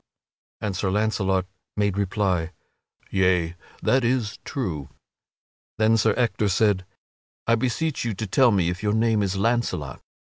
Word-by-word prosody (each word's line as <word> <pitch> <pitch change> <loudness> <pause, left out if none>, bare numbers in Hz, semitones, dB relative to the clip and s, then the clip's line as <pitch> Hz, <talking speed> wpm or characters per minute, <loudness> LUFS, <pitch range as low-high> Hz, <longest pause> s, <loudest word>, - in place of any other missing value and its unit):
And 105 -3 -2
Sir 95 +1 -1
Launcelot 95 -2 +1 0.3
made 100 -2 +1
reply: 95 -4 0 0.6
"Yea, 90 -3 +2 0.3
that 130 0 +3
is 120 0 0
true." 85 - -4 0.9
Then 110 +1 +4
Sir 110 -1 +3
Ector 115 -4 +1
said: 95 -1 +2 0.6
"I 115 - +3
beseech 130 +6 0
you 115 -3 -2
to 110 - -3
tell 125 +5 +4
me 95 -6 +2
if 90 +3 -6
your 105 -1 +1
name 110 -1 +2
is 100 -1 0
Launcelot." 100 - -1
105 Hz, 140 wpm, -24 LUFS, 95-115 Hz, 0.9 s, Then